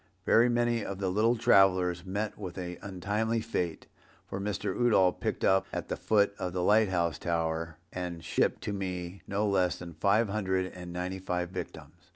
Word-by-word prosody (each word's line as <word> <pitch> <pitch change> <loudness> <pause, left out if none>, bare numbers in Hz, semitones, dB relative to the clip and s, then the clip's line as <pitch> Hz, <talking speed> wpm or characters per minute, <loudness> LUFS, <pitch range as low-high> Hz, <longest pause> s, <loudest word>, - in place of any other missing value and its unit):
Very 120 +2 +5
many 120 -1 +1
of 100 - -5
the 95 -1 -1
little 110 +5 +3
travellers 95 -5 +4
met 100 +3 -3
with 95 -4 -7
an 90 -1 -5
untimely 105 +4 -1
fate, 90 -7 -3 0.4
for 95 - -5
Mr. 100 -2 -2
Udall 105 -7 +4
picked - - -3
up 95 0 +3
at - - -4
the - - -1
foot 100 -2 +2
of 90 -1 -3
the 90 -1 -1
light 105 +1 +4
house 85 -3 0
tower, 80 -1 -2 0.2
and 90 -2 -5
shipped - - 0
to 105 - -2
me, 90 -1 -4
no 100 +2 0
less 95 -3 +2
than 85 -1 -9
five 100 +8 +2
hundred 95 -3 -1
and 90 -1 -8
ninety 90 +2 -4
five 90 -1 -2
victims. 80 -5 -7
95 Hz, 185 wpm, -30 LUFS, 90-105 Hz, 0.4 s, Very